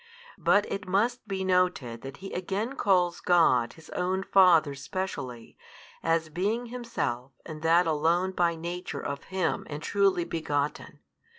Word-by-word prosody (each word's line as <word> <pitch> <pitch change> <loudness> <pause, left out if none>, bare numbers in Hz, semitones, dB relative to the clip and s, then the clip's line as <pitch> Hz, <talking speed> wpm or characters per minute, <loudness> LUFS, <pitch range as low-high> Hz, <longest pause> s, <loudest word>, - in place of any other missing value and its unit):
But 205 0 +4
it 195 -1 -4
must 220 +6 0
be 190 -1 -2
noted 180 -11 +1
that 135 +1 -8
He - - -7
again 200 +8 -2
calls 180 -7 +2
God 130 -9 +3
His 160 -1 -15
own 185 +1 -1
Father 175 -7 +5
specially, 135 - -5 0.5
as 165 -1 +1
being 205 +9 -1
Himself 135 - -3
and 155 -1 -8
that 165 +2 +4
Alone 165 +4 +1
by 175 -2 +1
Nature 175 +2 -5
of 140 0 -4
Him, 185 -4 -2
and 150 +1 -6
truly 195 -3 +2
Begotten. 150 -3 -3
175 Hz, 140 wpm, -28 LUFS, 150-190 Hz, 0.5 s, Father